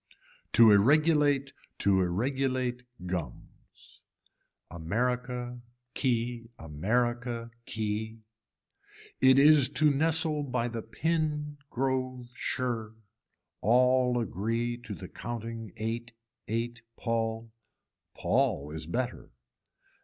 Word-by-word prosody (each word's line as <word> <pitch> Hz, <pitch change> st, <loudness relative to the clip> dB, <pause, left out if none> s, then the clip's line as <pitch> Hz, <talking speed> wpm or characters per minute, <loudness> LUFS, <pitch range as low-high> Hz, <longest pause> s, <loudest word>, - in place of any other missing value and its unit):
To 115 Hz, -2 st, +8 dB
irregulate 145 Hz, +4 st, +4 dB, 0.2 s
to 95 Hz, -2 st, +3 dB
irregulate 125 Hz, +6 st, -1 dB, 0.2 s
gums. 90 Hz, -8 st, -8 dB, 0.7 s
America 125 Hz, +7 st, -2 dB, 0.3 s
key 120 Hz, -2 st, -1 dB
america 115 Hz, +9 st, -1 dB, 0.2 s
key. 110 Hz, +1 st, -3 dB, 1.0 s
It 130 Hz, 0 st, +6 dB
is 145 Hz, -2 st, +7 dB
too 150 Hz, +1 st, +4 dB
nestle 155 Hz, +1 st, +2 dB
by 125 Hz, -4 st, -1 dB
the 115 Hz, -1 st, -4 dB
pin 150 Hz, +4 st, -2 dB
grove 130 Hz, -1 st, -2 dB
shirr, 115 Hz, -5 st, -3 dB, 0.7 s
all 125 Hz, +2 st, +4 dB
agree 115 Hz, +3 st, -1 dB
to 120 Hz, -4 st, -8 dB
the -, -, -9 dB
counting 115 Hz, -2 st, -6 dB
ate 115 Hz, +2 st, -4 dB, 0.3 s
ate 120 Hz, +2 st, -3 dB, 0.2 s
pall. 115 Hz, -1 st, -2 dB, 0.6 s
Paul 70 Hz, +2 st, 0 dB
is 80 Hz, 0 st, -6 dB
better. 125 Hz, +7 st, -3 dB
120 Hz, 85 wpm, -29 LUFS, 110-130 Hz, 1.0 s, To